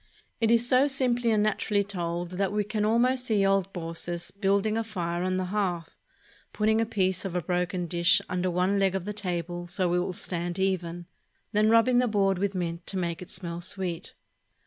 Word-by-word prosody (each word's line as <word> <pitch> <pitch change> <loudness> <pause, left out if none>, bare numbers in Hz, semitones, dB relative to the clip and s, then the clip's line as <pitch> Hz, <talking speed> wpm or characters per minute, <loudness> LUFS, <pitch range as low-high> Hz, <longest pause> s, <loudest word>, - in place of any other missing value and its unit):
It 225 - +2
is 235 +1 +4
so 255 +3 +4
simply 245 -3 +1
and 215 -2 +3
naturally 210 -1 +1
told 175 -3 -3
that 190 +1 -1
we 210 0 0
can 210 +1 -1
almost 250 +3 +2
see 210 -5 +2
old 195 -1 +2
Baucis 170 0 -4
building 200 +1 +1
a 225 - 0
fire 175 -6 -3
on 185 0 0
the 185 - -1
hearth, 180 -6 -2 0.6
putting 220 +1 +2
a 225 - 0
piece 190 -4 0
of 190 -3 -4
a 180 - +1
broken 180 0 -1
dish 170 +2 +3
under 185 0 -1
one 180 +3 +1
leg 195 -1 +2
of 190 -2 -3
the 210 - -3
table 175 -3 -4
so 175 0 0
it 180 - +3
will 180 - -1
stand 175 0 -4
even, 175 -3 -1 0.5
then 215 0 +3
rubbing 230 +2 +5
the 250 - +2
board 195 -4 +1
with 200 0 -1
mint 170 -1 -3
to 195 - -2
make 170 -2 -2
it 180 - -9
smell 175 -2 -5
sweet. 175 -2 -3
190 Hz, 200 wpm, -27 LUFS, 175-210 Hz, 0.6 s, rubbing